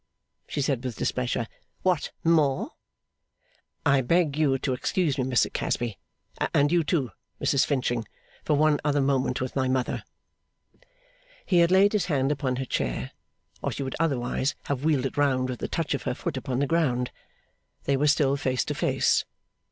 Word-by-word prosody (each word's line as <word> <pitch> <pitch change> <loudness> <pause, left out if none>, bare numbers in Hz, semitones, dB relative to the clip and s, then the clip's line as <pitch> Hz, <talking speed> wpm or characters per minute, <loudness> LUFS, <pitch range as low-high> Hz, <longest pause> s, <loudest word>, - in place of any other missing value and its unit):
she - - -2
said 135 -3 0
with 125 -3 -4
displeasure. 125 0 -1 0.4
'What 180 -5 +1
more?' 155 -5 +2 1.1
'I 140 -2 +4
beg 155 +2 +2
you 145 -3 +2
to 130 0 -1
excuse 150 +3 0
me, 130 - 0
Mr 125 -2 +2
Casby 120 -4 -2 0.6
and 145 +1 +4
you, 170 -1 +3
too, 145 - 0 0.3
Mrs 140 - +2
Finching 120 -5 0 0.4
for 150 - +2
one 150 0 +3
other 145 -1 +2
moment 135 -2 +1
with 130 - -3
my 130 -1 +1
mother 130 -1 0 0.7
' - - -31
He 180 -4 +3
had 170 0 +5
laid 195 +3 +5
his 205 -5 +1
hand 140 -4 +1
upon 135 -3 -1
her 130 +1 -3
chair, 65 - -2 0.5
or - - -1
she 140 - -4
would 130 - -4
otherwise 135 -3 0
have 140 -1 -3
wheeled 150 -4 +2
it 135 - -4
round 130 -3 +2
with 125 -3 -4
the - - -2
touch - - -1
of - - -2
her - - -2
foot - - -4
upon 125 -2 -3
the 140 - +2
ground. 135 -6 +1 0.7
They 140 - +1
were 145 +2 +2
still 145 -2 +3
face 130 -3 0
to - - -2
face. - - +2
140 Hz, 175 wpm, -26 LUFS, 130-155 Hz, 1.1 s, had